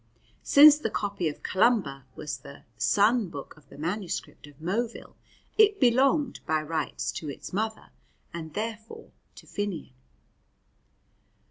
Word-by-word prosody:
Since 295 +1 +8
the 225 - -2
copy 200 -6 -2
of 145 - -10
Columba 185 - +1
was 150 - -5
the 140 0 -13
"son 205 - +3
book" 145 -4 -8
of 150 - -22
the - - -13
manuscript 175 0 -4
of 145 0 -17
Moville, 220 +8 -3 0.5
it 415 -2 +5
belonged 265 +2 +3
by 155 -1 +1
rights 155 -1 -2
to 155 - -6
its 140 - -8
mother, 220 +2 -3 0.4
and 160 -2 -7
therefore 220 0 -6 0.2
to - - -14
Finnian. 195 -10 -4
200 Hz, 130 wpm, -27 LUFS, 155-230 Hz, 0.5 s, Since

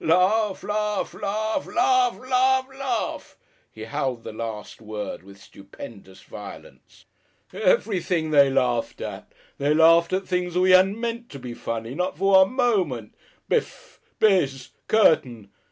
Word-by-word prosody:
Laugh, 190 +5 +2
laugh, 210 0 -2
laugh, 220 +6 -2
LAUGH, 380 +1 +2
LAUGH, 260 +1 +1
LAUGH" 265 -4 -4 0.4
(he 110 - -10
howled 130 -1 -3
the - - -8
last 110 -1 -7
word 105 -1 -6
with 100 +1 -16
stupendous 100 0 -13
violence). - - -12 0.5
Everything 185 - 0
they 140 -2 +6
laughed 125 -3 0
at. - - -7 0.3
They 145 +2 +2
laughed 165 +2 +5
at 190 +1 -2
things 180 -1 -2
that 180 - +2
we 185 0 +4
hadn't 190 +3 +5
meant 235 0 -4
to 140 - -9
be 125 -2 -8
funny 115 0 -5
not 180 0 -3
for 195 +3 +1
one 190 - -5
moment. 185 - 0 0.3
Bif! - - -3 0.2
Bizz! 140 - +2 0.2
Curtain. 125 - +2
180 Hz, 135 wpm, -24 LUFS, -, 0.5 s, they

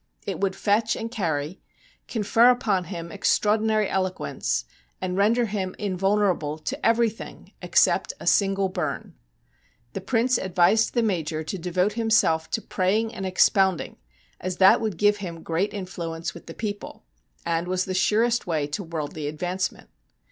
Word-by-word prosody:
It - - -4
would 195 -1 0
fetch 220 +2 +1
and 225 0 -5
carry, 165 -6 -2 0.5
confer 225 +2 +4
upon 210 -7 +1
him 170 -1 -7
extraordinary 215 +3 +2
elo 185 -1 0
quence, 185 - -3 0.4
and 185 -1 -3
render 225 +5 +3
him 195 -3 -3
invulnerable 195 -5 0
to 260 - -5
everything 230 -1 0
except - - +2
a - - -9
single 195 -1 +3
bum. 185 - -4 0.8
The 195 - -4
Prince 240 +4 +1
advised 190 +4 +2
the 235 - +3
Major 160 -7 -1
to 155 - -5
devote 180 +4 0
himself 205 -8 +2
to 220 - -2
'praying 210 +4 0
and 190 - -4
expounding,' 190 -1 +2 0.4
as 185 -1 -4
that 190 +3 +6
would 215 -6 -2
give 205 +3 +3
him 170 -5 -7
great 170 +5 -1
influence 170 -4 -5
with 170 - -13
the 165 - -9
people, 205 -2 -6 0.4
and 170 +1 -1
was 185 0 0
the 185 - -3
surest 215 +6 +2
way 155 -4 0
to 150 +7 -4
worldly 155 -3 -5
advancement. 180 +5 -3
190 Hz, 150 wpm, -25 LUFS, 175-215 Hz, 0.8 s, that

